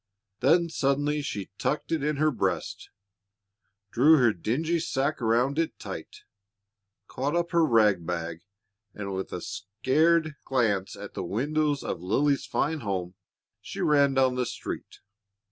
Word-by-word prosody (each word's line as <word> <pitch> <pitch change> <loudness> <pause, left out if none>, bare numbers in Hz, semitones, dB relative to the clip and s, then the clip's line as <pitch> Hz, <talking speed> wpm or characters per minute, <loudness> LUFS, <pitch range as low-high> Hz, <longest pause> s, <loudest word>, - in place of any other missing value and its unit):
Then 170 +7 +4
suddenly 145 -1 0
she 100 -10 -5
tucked 150 - -1
it 160 -4 0
in 150 +1 0
her 155 +2 +2
breast, 130 - -2 1.0
drew 150 +7 +6
her 120 -5 +4
dingy 155 - -1
sacque 140 -2 -1
around 120 +6 +2
it 165 - -1
tight, - - -8 0.8
caught 140 +5 -2
up 170 0 0
her 170 -1 +4
rag 110 - +4
bag, 85 -1 -4 0.5
and 100 -1 -5
with 95 0 -4
a 90 - -4
scared 155 +10 +1
glance 110 -7 0
at 100 0 -9
the - - -4
windows 145 - 0
of - - -4
Lily's 140 +10 +1
fine 155 +2 0
home, 95 -6 -3 0.5
she - - -8
ran 140 -2 +3
down 130 -1 +3
the 125 -1 -1
street. 120 - -7
135 Hz, 145 wpm, -27 LUFS, 105-150 Hz, 1.0 s, drew